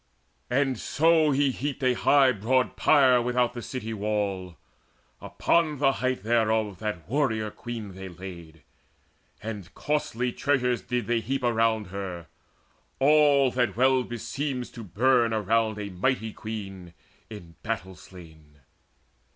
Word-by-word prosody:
And 130 -1 +1
so 160 +2 +3
he 140 -1 +2
heaped 140 +1 -4
A 130 -1 +3
high 135 +1 +4
broad 125 +4 0
pyre 130 -3 +5
without 125 0 +1
the 120 - -6
city 115 -2 -5
wall: 100 -4 -2 0.6
Upon 145 - +1
the 135 0 +3
height 130 -5 -2
thereof 110 -3 +1
that 105 -7 -4
warrior 110 -5 0
queen 115 -5 -7
They 95 0 -8
laid, 85 -3 -11 0.8
and 105 -5 -6
costly 125 -5 -1
treasures 125 -4 0
did 125 +3 -2
they 120 0 +1
heap 135 +3 -3
Around 115 -4 +1
her, 90 -4 -5 0.7
all 140 -1 +4
that 125 -2 0
well 130 +1 +4
beseems 125 +2 -4
to 115 - -9
burn 115 +4 +2
Around 110 +1 +1
a 100 -1 -5
mighty 110 +3 -1
queen 95 -5 -7 0.3
in 90 -7 -10
battle 100 -4 -4
slain. 80 -5 -15
115 Hz, 130 wpm, -26 LUFS, 100-130 Hz, 0.8 s, pyre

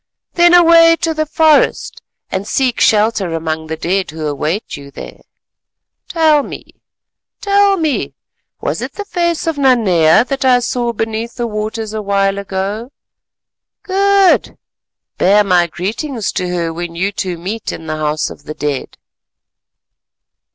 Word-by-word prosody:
Then 345 0 +5
away 335 -1 +6
to 325 -1 0
the 310 0 -2
forest 315 -1 +2 0.3
and 190 +2 -3
seek 255 -2 0
shelter 210 -5 +2
among 160 -1 -3
the 160 0 -4
dead 185 +4 -1
who 155 0 -6
await 150 +7 -3
you 140 0 -11
there. 140 - -11 0.9
Tell 315 -3 +3
me, - - -11 0.6
tell 400 -1 +3
me, 315 -5 -2 0.4
was - - -3
it - - -5
the 410 - -6
face 340 -4 -1
of 325 -3 -2
Nanea 220 - +4
that 275 0 -3
I 255 -1 +5
saw 240 0 -1
beneath 225 +1 -4
the 240 - -2
waters 215 0 -4
a 215 - -3
while 200 -1 0
ago? 200 +5 -4 0.9
Good! 395 0 +2 0.6
bear 205 +3 +4
my 180 -3 +2
greetings 215 - -4
to 180 -1 -3
her 170 -2 -2
when 170 0 -6
you 190 +4 -1
two 185 -3 -4
meet 205 +6 -5
in 160 - -8
the 155 -1 -4
House 155 0 -2
of 145 - -13
the 155 - -7
Dead." 145 -3 -4
215 Hz, 145 wpm, -15 LUFS, -, 0.9 s, away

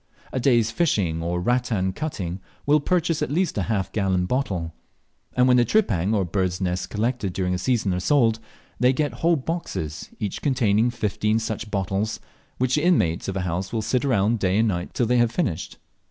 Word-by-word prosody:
A - - 0
day's 120 -3 +3
fishing 100 - +1
or 85 +1 -1
rattan 110 -3 0
cutting 95 - -4 0.3
will 150 +1 +4
purchase 165 +1 0
at - - 0
least 175 +5 0
a 100 - -2
half 100 -5 -1
gallon 95 -3 +1
bottle; 90 -9 -2 0.6
and 125 0 +4
when 125 -1 +5
the 120 - +5
tripang 110 - +1
or 100 -3 +1
birds' 90 0 -1
nests 90 -1 -1
collected 110 -3 -1
during 90 -1 -1
a 90 - -1
season 105 -3 +1
are 90 - -1
sold, 115 +1 +3 0.4
they 125 +1 +4
get 145 +2 -1
whole 170 +1 +4
boxes, 135 - -4
each 105 - -4
containing 120 -5 +2
fifteen 110 -2 0
such 110 -1 -3
bottles, 100 +1 -1 0.4
which 130 0 0
the 150 - +2
inmates 90 - +2
of 95 0 -2
a - - -1
house 90 +2 -3
will 110 -2 -1
sit 125 +4 0
round 115 -4 +2
day 95 0 +1
and 115 +1 +3
night 90 -2 -4
till 120 - +2
they 125 +2 +2
have 120 -1 +3
finished. 120 - -2
110 Hz, 195 wpm, -24 LUFS, 95-125 Hz, 0.6 s, when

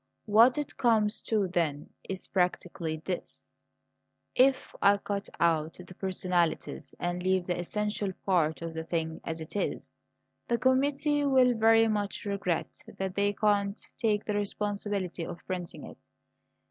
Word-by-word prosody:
What 230 +5 +6
it 295 -2 -4
comes 220 -3 +2
to, 210 -4 +2
then, 165 -5 -1 0.2
is 190 -1 -4
practically 175 -3 -1
this: 180 -2 -5 0.9
if 265 +1 +3
I 200 0 +6
cut 200 0 -4
out 165 -2 +2
the 180 +1 -11
personalities 180 -3 -1
and 175 0 -2
leave 185 0 +1
the 175 -1 -1
essential 210 +2 -2
part 165 -4 +1
of 165 -1 -4
the 160 0 -4
thing 160 -1 -3
as 160 0 -4
it 160 - -9
is, 205 - -3 0.5
the 235 - +2
committee 285 +3 +2
will 260 -3 +4
very 225 0 +5
much 205 -2 -2
regret 200 -4 -2 0.2
that 190 -1 -2
they 200 +1 +1
can't 205 0 +1 0.2
take 215 -4 0
the 210 - -1
responsibility 205 -3 -2
of 170 - -6
printing 180 -2 -5
it. - - -11
200 Hz, 145 wpm, -29 LUFS, 175-215 Hz, 0.9 s, What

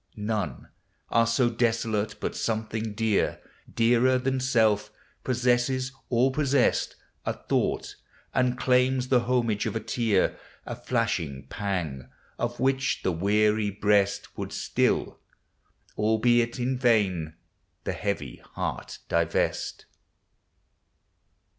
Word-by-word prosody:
None 105 -1 -3 0.4
are 115 0 +3
so 120 +2 +3
desolate 115 -3 0
but - - -3
something 110 -1 -2
dear, 110 -1 +1 0.3
Dearer 120 +2 +3
than 130 +1 0
self, 110 -5 +2 0.3
possesses 125 +1 +1 0.2
or 125 +2 +3
possessed 140 -1 +1 0.3
A - - -1
thought, - - -2 0.4
and 125 -1 +2
claims 125 0 +2
the 125 - +5
homage 115 -4 +1
of - - -3
b - - 0
tear; 110 -3 +1 0.3
A - - -5
flashing 85 - -2
pang! 85 -11 -3 0.3
of 120 0 -2
which 130 -1 +1
the 95 - +1
wear} 105 +5 +2 0.2
breast 100 -1 +1
Would - - -5
still, - - 0 0.8
albeit 115 +3 +2
in 125 +1 -1
vain, 95 -10 +2 0.5
the - - -2
he; 100 - -3
iv.\ 100 - -4 0.2
heart - - -4
divest. 85 -1 0
115 Hz, 110 wpm, -27 LUFS, 105-125 Hz, 0.8 s, the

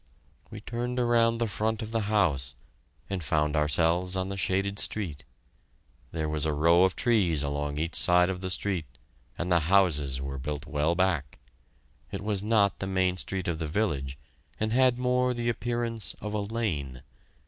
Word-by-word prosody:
We - - -9
turned 120 +1 -4
around 115 -1 +3
the 115 - 0
front 110 +2 -1
of 110 - -7
the 115 - +1
house 70 -11 +1 0.5
and 95 -3 -3
found 75 +1 +1
ourselves 85 +4 +2
on 95 0 -1
the 100 - -3
shaded 95 +2 0
street. 90 -10 -2 0.9
There 80 -1 -2
was 75 -1 0
a 80 - +1
row 85 +4 +5
of 95 - 0
trees 90 -11 +2
along 70 0 -2
each 80 +2 -2
side 90 0 +4
of 90 -1 -3
the 95 - -3
street 90 -2 -1 0.5
and 90 +1 -3
the 85 - +5
houses 75 -9 +3
were 70 0 -5
built 75 +2 -4
well 75 +2 0
back. 85 -7 0 0.7
It - - -5
was 105 -2 0
not 105 -2 +2
the 95 - -3
main 95 -1 +1
street 95 0 -3
of 85 -2 -2
the 80 - -2
village 75 -7 -1 0.4
and 110 +1 0
had 130 -1 +4
more 125 0 +1
the 120 0 -1
appearance 120 -1 -2
of 105 0 -5
a 105 - 0
lane. 85 - -3
95 Hz, 175 wpm, -28 LUFS, 75-110 Hz, 0.9 s, row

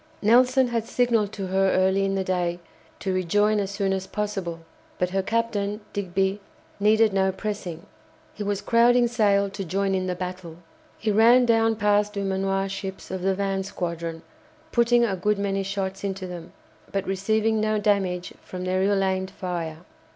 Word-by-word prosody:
Nelson 250 +3 +4
had 230 -2 -1
signalled 235 -4 +1
to 195 - -4
her 190 +1 +2
early 190 +1 +2
in 195 0 0
the 190 - 0
day 180 -2 -1 0.4
to 190 - -1
rejoin 205 +4 +2
as 195 -1 -2
soon 200 -1 -1
as 190 0 -3
possible, 195 -6 -3 0.4
but 180 0 -1
her 195 +1 +1
captain, 210 -1 -1
Digby, 195 +1 -1 0.4
needed 215 +1 +4
no 190 0 +2
pressing. 190 -4 -5 0.5
He - - -10
was 205 -1 -2
crowding 240 +1 +4
sail 205 -4 +2
to 195 - -5
join 195 +2 -1
in 185 -1 -1
the 180 - -1
battle. 180 -2 -6 0.4
He 220 - -1
ran 235 +4 +6
down 225 -1 +3
past 210 -1 +2
Dumanoir's 195 -1 -1
ships 195 -1 -6
of 190 -1 -3
the 190 +1 +1
van 195 0 -1
squadron, 170 -4 -4 0.5
putting 235 0 +4
a 200 -4 -1
good 210 +3 0
many 195 -1 -1
shots 195 0 -3
into 195 -1 -3
them, 175 -1 -8 0.4
but 195 0 -1
receiving 215 +3 +1
no 215 0 +1
damage 195 -4 0
from 180 -1 -7
their 185 +1 0
ill 195 0 +2
aimed 190 0 -1
fire. 175 -3 -5
195 Hz, 170 wpm, -25 LUFS, 185-210 Hz, 0.5 s, ran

